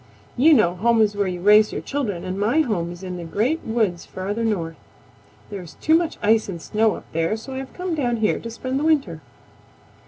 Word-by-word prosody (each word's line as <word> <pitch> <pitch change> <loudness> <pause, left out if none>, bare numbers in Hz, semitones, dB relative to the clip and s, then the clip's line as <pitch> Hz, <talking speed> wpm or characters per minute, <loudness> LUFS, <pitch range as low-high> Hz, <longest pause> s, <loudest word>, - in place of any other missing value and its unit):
You 305 +5 +6
know 175 -9 +3
home 230 +4 +3
is 210 -2 +3
where 200 -1 0
you 180 -1 -4
raise 210 +2 +6
your - - -3
children, 230 -11 -3
and 185 +1 -4
my 235 +10 +3
home 185 - -1
is 175 +2 -10
in 180 -1 -5
the 175 - -6
Great 230 - -1
Woods 220 -7 -1
farther 205 +5 -4
north. 170 -8 -1 0.8
There 200 -2 -5
is 170 -4 -12
too 315 - +1
much 330 -1 0
ice 220 0 +3
and 175 -3 -5
snow 215 +5 +1
up - - -11
there, 165 +6 0
so 265 +4 -9
I - - -5
have 270 - -8
come 365 -1 -3
down 245 -6 0
here 220 -1 +1
to 230 - -7
spend 255 +3 -3
the - - -2
winter." 275 - +1
215 Hz, 225 wpm, -22 LUFS, 185-255 Hz, 0.8 s, You